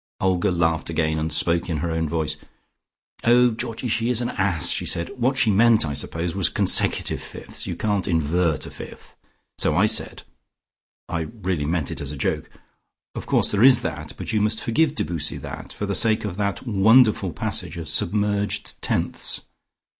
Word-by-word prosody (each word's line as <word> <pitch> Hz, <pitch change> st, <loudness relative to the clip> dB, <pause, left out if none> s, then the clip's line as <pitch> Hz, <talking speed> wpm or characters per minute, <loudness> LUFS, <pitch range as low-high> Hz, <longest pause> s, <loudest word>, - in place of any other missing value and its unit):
'" -, -, -84 dB
Olga 95 Hz, -2 st, +1 dB
laughed 80 Hz, -3 st, 0 dB
again, 80 Hz, -1 st, 0 dB
and 80 Hz, +1 st, -2 dB
spoke 85 Hz, +3 st, +1 dB
in 80 Hz, -, -1 dB
her 80 Hz, +3 st, -2 dB
own 80 Hz, -1 st, -1 dB
voice. 80 Hz, -2 st, -1 dB, 0.9 s
"Oh, 120 Hz, +1 st, +5 dB
Georgie, 115 Hz, +2 st, -4 dB
she 115 Hz, +1 st, 0 dB
is 125 Hz, -2 st, +2 dB
an 120 Hz, -, -2 dB
ass," 90 Hz, -5 st, 0 dB
she -, -, -1 dB
said. 85 Hz, 0 st, -1 dB
"What 130 Hz, +2 st, 0 dB
she 110 Hz, -, +3 dB
meant 110 Hz, -1 st, +4 dB
I 70 Hz, -, -3 dB
suppose 85 Hz, +3 st, -2 dB
was 95 Hz, -3 st, +1 dB
consecutive -, -, +1 dB
fifths; -, -, -6 dB
you -, -, -3 dB
can't 105 Hz, -3 st, -1 dB
invert 80 Hz, -1 st, 0 dB
a -, -, -9 dB
fifth. -, -, -11 dB, 0.4 s
So 75 Hz, -, +2 dB
I 95 Hz, +5 st, +4 dB
said 110 Hz, 0 st, +1 dB, 0.8 s
(I 80 Hz, -1 st, -3 dB, 0.2 s
really 90 Hz, -6 st, -1 dB
meant 80 Hz, -3 st, -1 dB
it -, -, -5 dB
as 70 Hz, -1 st, -4 dB
a 75 Hz, -, -7 dB
joke), -, -, -2 dB, 0.6 s
'Of -, -, -7 dB
course -, -, +2 dB
there 105 Hz, -, +1 dB
is 130 Hz, 0 st, +7 dB
that, -, -, -5 dB
but -, -, -5 dB
you 105 Hz, -, +2 dB
must 110 Hz, +1 st, 0 dB
forgive 150 Hz, +6 st, +1 dB
Debussy 80 Hz, -, -2 dB
that -, -, -8 dB
for 105 Hz, -, -4 dB
the 100 Hz, -, -2 dB
sake 110 Hz, +1 st, +2 dB
of 100 Hz, -4 st, -4 dB
that 100 Hz, +2 st, -2 dB
wonderful 110 Hz, -2 st, +4 dB
passage 80 Hz, +2 st, -1 dB
of 85 Hz, -1 st, -6 dB
submerged 105 Hz, +2 st, 0 dB
tenths!' -, -, +1 dB
95 Hz, 185 wpm, -23 LUFS, 80-110 Hz, 0.9 s, is